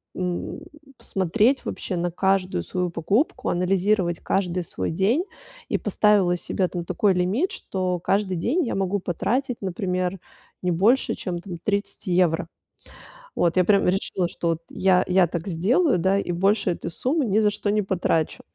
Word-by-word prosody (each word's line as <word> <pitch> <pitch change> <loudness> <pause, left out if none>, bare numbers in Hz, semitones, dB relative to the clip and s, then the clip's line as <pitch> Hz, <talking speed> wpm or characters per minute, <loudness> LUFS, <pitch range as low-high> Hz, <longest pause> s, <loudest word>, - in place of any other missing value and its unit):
м, 180 -1 -3 0.4
смотреть 215 +8 +1
вообще 185 - -4
на 175 0 -1
каждую 190 +1 +1
свою 180 -1 -2
покупку, 195 - 0
анализировать 180 -1 +1
каждый 180 -2 -1
свой 95 - -4
день 205 - +2 0.5
и - - +1
поставила 200 -4 +3
себе 180 +1 -1
там 175 -1 -5
такой 185 +3 +1
лимит, 190 - 0
что 185 -2 -2
каждый 195 0 0
день 270 - 0
я - - -2
могу 195 +1 0
потратить, 240 +8 -2
например, 185 -1 -2 0.4
не 180 - 0
больше, 210 +10 +2
чем 175 -2 -4
там 175 0 -7
30 200 +1 -2
евро. 175 -2 +2 0.9
Вот 170 +1 +1
я 185 - +6
прямо 200 +2 +3
решила, 185 -1 -1
что 170 - -4
вот 165 0 -1
я 185 -1 +3
я 185 -1 +4
так 170 +2 -5
сделаю, 200 - +2
да, 190 +3 +2
и 190 -3 -2
больше 195 +2 +2
этой 170 - -4
суммы 265 - 0
ни 210 -2 +1
за 210 -1 +3
что 205 0 -3
не 210 0 +2
потрачу. 175 -4 0
185 Hz, 160 wpm, -24 LUFS, 175-205 Hz, 0.9 s, я